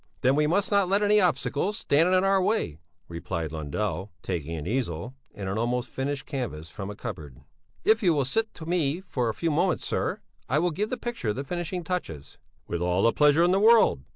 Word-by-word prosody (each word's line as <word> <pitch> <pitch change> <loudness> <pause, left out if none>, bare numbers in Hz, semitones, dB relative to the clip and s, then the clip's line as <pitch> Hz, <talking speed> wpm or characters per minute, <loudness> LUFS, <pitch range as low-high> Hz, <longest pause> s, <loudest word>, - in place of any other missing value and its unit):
"Then 130 +2 +3
we 150 0 +3
must 190 +7 +1
not 200 -3 +3
let 200 +2 +2
any 210 0 +4
obstacles 180 +4 0
stand 165 -1 +3
in 185 0 +4
our 195 0 +3
way," 185 - 0 0.3
replied 85 -2 -4
Lundell, 85 +5 -3
taking 85 -3 -3
an 75 - -5
easel 115 0 -2 0.2
and 100 -2 -5
an 100 +3 -2
almost 120 +2 -1
finished 135 +1 -3
canvas 100 - -5
from 100 -1 -6
a 105 - -6
cupboard. 75 -9 -8 0.4
"If 220 +1 +4
you 175 -6 +3
will 140 -3 +1
sit 220 - 0
to 160 - -9
me 165 -1 0
for 125 -11 -2
a - - -1
few 165 -1 -1
moments, 175 +4 +1
sir, - - -1 0.3
I 135 - +2
will 175 +3 +2
give 210 +7 -2
the 255 - -2
picture 230 - -3
the 135 - -4
finishing 175 +3 -4
touches." 160 - -5 0.3
"With 85 - -3
all 90 +2 +1
the 115 - +4
pleasure 150 +2 +5
in 175 - +4
the 190 - +3
world." 220 - +5
140 Hz, 210 wpm, -27 LUFS, -, 0.4 s, pleasure